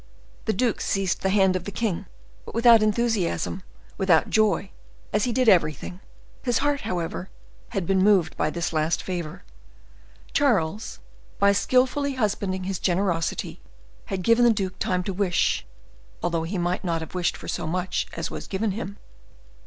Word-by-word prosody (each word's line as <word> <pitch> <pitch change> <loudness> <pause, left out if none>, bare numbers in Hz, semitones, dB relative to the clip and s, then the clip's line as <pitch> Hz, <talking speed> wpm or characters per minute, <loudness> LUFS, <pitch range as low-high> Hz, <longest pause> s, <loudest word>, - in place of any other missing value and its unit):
The 220 - +1
duke 235 +2 0
seized 195 -2 0
the 190 - +1
hand 190 -1 +3
of 185 0 -3
the 200 - -4
king, 205 -4 -2 0.4
but - - -10
without 230 -1 +7
enthusiasm, 215 -5 0 0.4
without 180 -5 +3
joy, 210 -3 +2 0.4
as 210 0 +2
he 245 - 0
did 255 +1 +1
everything. 175 -2 +2 0.4
His 245 -3 +1
heart, 290 0 +1
however, 180 +1 -3 0.4
had 195 -3 -2
been 190 +1 +2
moved 200 -4 +4
by - - 0
this 170 +1 -3
last 155 +1 0
favor. 175 -5 -5 0.9
Charles, 215 - +1 0.4
by 200 0 +5
skillfully 260 +6 +2
husbanding 200 -5 -1
his 190 -1 -3
generosity, 175 -2 -1 0.4
had 190 -2 -3
given 230 +3 +4
the 240 - +6
duke 190 -4 -2
time 180 -1 0
to 195 - -3
wish, 185 -2 +1 0.6
although 170 -2 0
he 190 +4 -3
might 175 +1 -1
not 165 -3 -1
have 160 - -8
wished 180 -1 0
for - - -10
so - - -3
much 180 +2 -1
as 165 - -4
was - - -6
given 205 +2 -1
him. 200 0 -5
190 Hz, 160 wpm, -25 LUFS, 175-215 Hz, 0.9 s, without